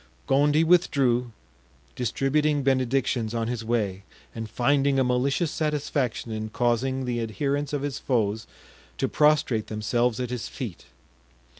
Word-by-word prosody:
Gondy 145 +3 +3
withdrew, 135 -8 +3 0.6
distributing 145 +4 +1
benedictions 130 -3 +1
on 115 -1 -1
his 120 -1 -3
way, 105 -5 -1 0.3
and 110 -1 -6
finding 140 +4 +2
a 135 - +4
malicious 135 +6 +1
satisfaction 145 -6 -2
in 110 0 -4
causing 125 +3 0
the 120 -1 -1
adherents 140 +6 -2
of 145 -2 -2
his 140 -2 -3
foes 110 -4 -1 0.5
to - - 0
prostrate 150 -7 +2
themselves 115 +2 0
at 125 -1 -3
his 125 -2 -3
feet. 115 -10 -7
125 Hz, 130 wpm, -26 LUFS, 115-140 Hz, 0.6 s, a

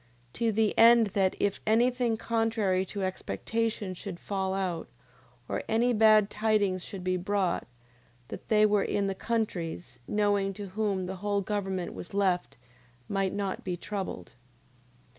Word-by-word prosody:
To 230 -1 +1
the 220 0 +1
end 230 -1 +7
that 190 -2 +2
if 200 -1 0
any 235 +3 +4
thing 240 -3 0
contrary 220 -5 0
to 200 0 -4
expectation 210 +2 -2
should 180 -1 -7
fall 190 -1 -2
out, 180 -4 -2 0.6
or - - -2
any 235 +2 +3
bad 215 -2 +6
tidings 210 -4 +1
should 190 -2 -7
be 185 0 0
brought, 190 0 -1 0.6
they - - -5 0.3
that - - +7
were 205 -1 +3
in 200 - 0
the 195 - 0
countries, 180 - -3
knowing 205 -2 +1
to 200 -1 -7
whom 200 -2 -1
the 190 +1 -5
whole 205 +1 0
government 190 -3 -3
was 180 - -9
left, 185 -7 0 0.5
might 195 -1 0
not 200 -2 -3
be 180 -2 -3
troubled. 190 - -5
200 Hz, 150 wpm, -29 LUFS, 185-220 Hz, 0.6 s, end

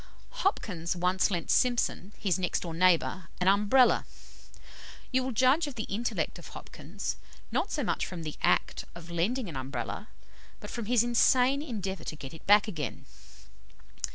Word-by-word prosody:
"Hopkins 180 - -1
once 180 +2 +2
lent 175 -4 -1
Simpson, 240 -5 +1
his 185 -4 0
next 180 - -1
door 170 -2 -5
neighbour, 180 0 +2
an 180 - 0
Umbrella. 210 +6 +5 1.1
You 260 0 +3
will 260 - -2
judge 260 +7 +3
of 285 - -6
the 220 - -3
intellect 225 +5 -2
of - - -11
Hopkins, - - -6 0.3
not - - 0
so - - -1
much - - -1
from 175 -3 -6
the 155 -1 -4
act - - +1
of 170 0 -10
lending 210 +9 0
an 165 - -7
Umbrella, 130 -2 -4 0.5
but 210 - -9
from 235 -2 -4
his 240 -1 +4
insane 250 +3 +4
endeavour 200 - -4
to - - -4
get 135 -1 -9
it 160 - -13
back 205 +1 +6
again. 155 - -5
195 Hz, 160 wpm, -29 LUFS, 170-240 Hz, 1.1 s, back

